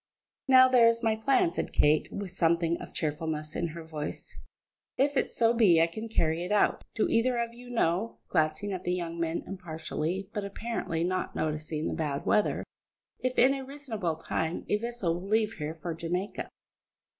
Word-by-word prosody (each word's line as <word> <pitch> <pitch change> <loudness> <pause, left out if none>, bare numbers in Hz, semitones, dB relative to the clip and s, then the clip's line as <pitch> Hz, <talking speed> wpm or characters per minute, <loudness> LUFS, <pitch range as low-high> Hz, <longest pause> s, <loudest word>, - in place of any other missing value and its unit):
"Now 260 -1 +8
there 250 -2 +6
is 230 +1 +2
my 220 -1 +3
plan," 220 -5 +2
said - - -3
Kate, 150 +1 +3
with 200 -2 -5
something 170 -1 +2
of - - -9
cheerfulness 155 0 -3
in 170 - 0
her 165 +1 -7
voice, 155 -2 -6 0.6
"if 285 +2 +2
it - - +1
so 230 0 +3
be 205 -8 +5
I 165 - +6
can 220 +7 -6
carry 165 -5 +1
it 180 - -5
out. 210 - +2
Do 220 - +2
either 240 +2 +2
of 235 0 -2
you 245 +1 -12
know," 220 -2 0
glancing 160 +4 0
at 185 -1 -4
the 180 - 0
young 170 -1 -4
men 165 0 -1
impartially, 180 0 -4
but 205 - -2
apparently 200 -5 -3
not 185 +1 -2
noticing 155 0 -2
the - - -2
bad 145 -3 -2
weather, 210 - +2 0.6
"if 255 0 -2
in 260 +3 +6
a 270 -1 -4
reasonable 250 - -4
time 160 +1 -3
a 210 - +3
vessel 235 -6 -2
will 190 - -8
leave 220 0 +2
here 150 +1 -4
for 170 +1 -4
Jamaica?" 175 +5 -3
180 Hz, 185 wpm, -29 LUFS, 160-230 Hz, 0.6 s, Now